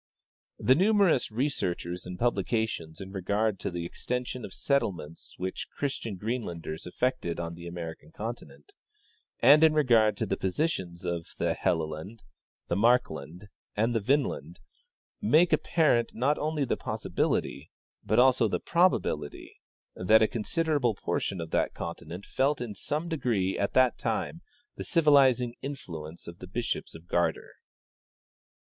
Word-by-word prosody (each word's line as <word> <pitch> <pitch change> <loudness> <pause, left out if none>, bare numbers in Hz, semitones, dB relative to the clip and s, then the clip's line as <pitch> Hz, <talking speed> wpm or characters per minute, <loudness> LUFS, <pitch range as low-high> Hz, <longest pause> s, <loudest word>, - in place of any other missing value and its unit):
" - - -68
The - - +10
numerous 195 - +3
researches 95 -9 -2
and 90 0 -6
publications 110 -8 -1
in 95 0 -8
regard 100 +2 0
to - - -2
the 85 -2 -4
extension 125 +6 -4
of - - -7
settlements 85 - -2
which 95 +1 -4
Christian 130 -7 -3
Greenlanders 90 -7 -4
effected 90 -5 -1
on 85 0 -4
the 85 +1 -9
American 85 -3 -7
continent, 80 - -8 0.7
and 145 +6 +7
in 155 -1 +6
regard 115 -8 +4
to - - -1
the 95 - -1
positions 95 - -2
of 85 -1 -2
the - - +1
Helleland, 80 +6 -2 0.4
the - - 0
Markland 95 - +1 0.3
and 115 +3 +1
the 115 - +2
Vinland, 140 +8 0 0.6
make 175 -4 +4
apparent, 140 -8 +2
not 135 +6 +1
only 150 -1 0
the - - 0
possibility, 70 +3 -2 0.3
but 105 +1 +1
also 125 -2 +5
the - - -1
probability, 170 - 0 0.4
that 110 +5 +5
a - - +4
considerable 140 +1 0
portion 95 0 -2
of 80 -1 -6
that - - 0
continent 90 +4 -6
felt 140 +2 +1
in 120 -4 -4
some 150 - -3
degree 120 - 0
at 100 - -1
that 130 -1 +4
time 115 +8 -2 0.4
the - - -4
civilizing 135 -7 +4
influence 85 - -7
of 85 +1 -9
the 90 - -9
bishops 115 0 -3
of 80 +1 -12
Gardar. 85 0 0
110 Hz, 140 wpm, -28 LUFS, 85-130 Hz, 0.7 s, The